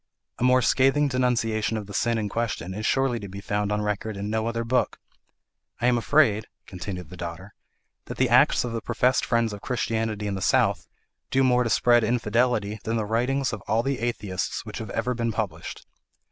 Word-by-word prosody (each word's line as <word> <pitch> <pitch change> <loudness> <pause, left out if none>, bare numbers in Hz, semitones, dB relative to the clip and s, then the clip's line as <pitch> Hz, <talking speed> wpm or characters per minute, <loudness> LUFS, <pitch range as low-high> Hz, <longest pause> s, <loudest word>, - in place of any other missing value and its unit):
A - - -1
more 125 0 +4
scathing 135 +4 +3
denunciation 115 -4 0
of 105 - -5
the 100 - -10
sin 115 +3 +1
in 105 -2 -1
question 105 -4 -3
is 105 +3 -2
surely 135 -3 +1
to 100 - -7
be 100 +1 -7
found 105 +1 -2
on 105 0 0
record 105 0 -3
in 100 +1 -4
no 110 0 0
other 115 0 -2
book. 125 +2 0 0.8
I - - -1
am 125 0 +4
afraid," 115 -3 +3 0.2
continued 90 -2 -7
the 90 - -9
daughter, 85 +3 -7 0.5
"that - - -7
the - - +3
acts - - +4
of 120 - -3
the 115 0 -3
professed 125 +3 +1
friends 115 -2 +1
of 100 - -8
Christianity 110 -3 -2
in 100 - -2
the 95 - -4
South - - +2 0.4
do 135 0 +2
more 125 -1 +4
to 115 - -1
spread 120 +1 +4
infidelity 110 -2 +1
than 115 +1 -1
the 110 - -1
writings 125 +5 0
of 110 - -5
all 115 +2 +2
the 135 0 -1
atheists 105 -6 -3
which - - -6
have 110 - -6
ever 125 +5 -1
been 115 -1 -1
published. 105 - -5
115 Hz, 200 wpm, -25 LUFS, 105-125 Hz, 0.8 s, more